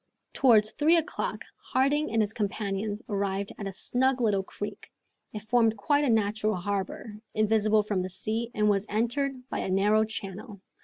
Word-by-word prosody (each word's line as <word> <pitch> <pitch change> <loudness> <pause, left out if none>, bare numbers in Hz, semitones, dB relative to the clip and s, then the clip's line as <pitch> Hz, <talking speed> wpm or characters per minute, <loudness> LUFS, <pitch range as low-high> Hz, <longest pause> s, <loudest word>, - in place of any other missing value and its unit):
Towards 220 -5 +5
three 315 +3 +3
o'clock 330 +1 -3
Harding 285 +4 0
and 225 0 +2
his 210 +1 -2
companions 205 0 -3
arrived 200 -2 -2
at 200 - -4
a - - -4
snug 255 +6 0
little 210 -5 +2
creek. 205 +2 -8 0.4
It 210 -1 -7
formed 225 0 +2
quite 290 +8 +2
a 280 - +1
natural 215 -1 +1
harbor, 200 +3 -4 0.2
invisible 215 0 +3
from 205 -3 -1
the 185 - -4
sea, 220 +5 -2
and 210 0 +2
was 205 0 +1
entered 250 +4 -1
by - - -3
a - - -3
narrow 205 +3 +3
channel. 210 0 -6
215 Hz, 165 wpm, -28 LUFS, 200-235 Hz, 0.4 s, Towards